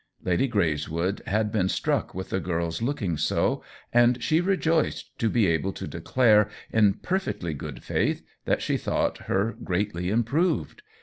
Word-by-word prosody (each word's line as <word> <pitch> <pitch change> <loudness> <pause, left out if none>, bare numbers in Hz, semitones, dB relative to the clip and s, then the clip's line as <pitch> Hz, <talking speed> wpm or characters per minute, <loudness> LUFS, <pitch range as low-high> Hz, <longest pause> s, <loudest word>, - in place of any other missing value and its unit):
Lady 90 +9 +2
Greyswood 85 -1 0
had 105 +1 +1
been 95 -4 +1
struck - - -1
with 95 0 -5
the 95 - +1
girl's 85 0 -2
looking 110 - -1
so, - - +1 0.3
and 120 0 +4
she 155 +6 +3
rejoiced 170 -4 0
to 115 - +2
be 115 -2 +3
able 85 +2 +1
to - - -6
declare, 105 -5 +3 0.2
in 105 -3 +4
perfectly 180 - -2
good* 70 - -7
faith, - - 0 0.2
that - - +1
she - - +1
thought - - -1
her 105 +3 +1
greatly 90 -1 -1
improved. 145 - 0
105 Hz, 150 wpm, -26 LUFS, 90-120 Hz, 0.3 s, and